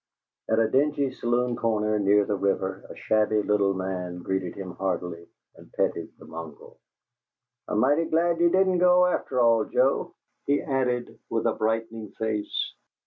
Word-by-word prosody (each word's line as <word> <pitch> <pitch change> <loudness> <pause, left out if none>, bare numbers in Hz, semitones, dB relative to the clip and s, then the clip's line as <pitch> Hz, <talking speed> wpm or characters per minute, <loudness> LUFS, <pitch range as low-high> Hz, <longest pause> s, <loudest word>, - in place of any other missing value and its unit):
At 110 - +2
a 115 -1 +3
dingy 140 +1 +1
saloon 120 -1 0
corner, 110 -2 0
near 100 0 +4
the 105 - -1
river, 95 -1 -2
a - - -9
shabby 110 -1 +1
little 100 -2 +2
man 90 -2 -4
greeted 95 -2 -2
him 95 -2 -6
heartily 90 -2 -4 0.3
and - - -17
petted - - -1
the - - -14
mongrel. 80 -3 -10 0.9
"I'm - - -1
mighty 145 +6 +3
glad 165 +1 +1
you 170 0 +5
didn't 185 0 +3
go, 180 0 +5
after 180 -7 -1
all, 115 -2 +4
Joe," 135 +2 +1 0.3
he 145 0 +3
added, 125 -3 -2
with - - -1
a - - +2
brightening 110 0 -2
face. 110 -2 -2
110 Hz, 155 wpm, -26 LUFS, 95-135 Hz, 0.9 s, you